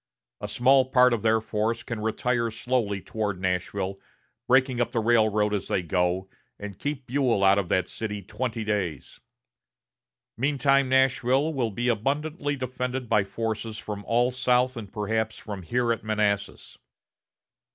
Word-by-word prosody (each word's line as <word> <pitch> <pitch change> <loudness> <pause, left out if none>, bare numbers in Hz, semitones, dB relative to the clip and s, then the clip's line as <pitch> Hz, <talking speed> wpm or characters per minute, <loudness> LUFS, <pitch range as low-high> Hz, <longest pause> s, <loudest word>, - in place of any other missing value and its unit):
A 105 - -5
small 130 +5 +4
part 125 -1 +4
of 115 - -1
their 110 0 +3
force 110 +1 -2
can 115 -3 -5
retire 115 +2 0
slowly 110 -3 -1
toward 105 -3 -3
Nashville, 95 +1 -2 0.5
breaking 130 -1 +3
up 120 0 -1
the 115 - +1
railroad 110 -2 +2
as 100 -2 -2
they 90 - 0
go, 90 +1 0 0.3
and 100 -2 -8
keep 145 -2 -4
Buell 125 -5 +1
out 100 +1 +5
of 90 -4 -3
that 95 - +1
city 105 -2 -5
twenty 110 +3 -3
days. 95 -9 -3 1.2
Meantime, 135 +1 +2
Nashville 130 +3 +2
will 125 -5 0
be 120 +4 -3
abundantly 145 - -1
defended 125 -1 -4
by 105 - +4
forces 110 +2 -4
from 105 -1 -6
all 120 +2 +2
south 125 0 +2
and 105 -5 -8
perhaps 110 +1 -2
from 100 -3 -7
here 120 +7 +1
at 115 - -7
Manassas. 105 -2 -2
115 Hz, 150 wpm, -26 LUFS, 105-125 Hz, 1.2 s, out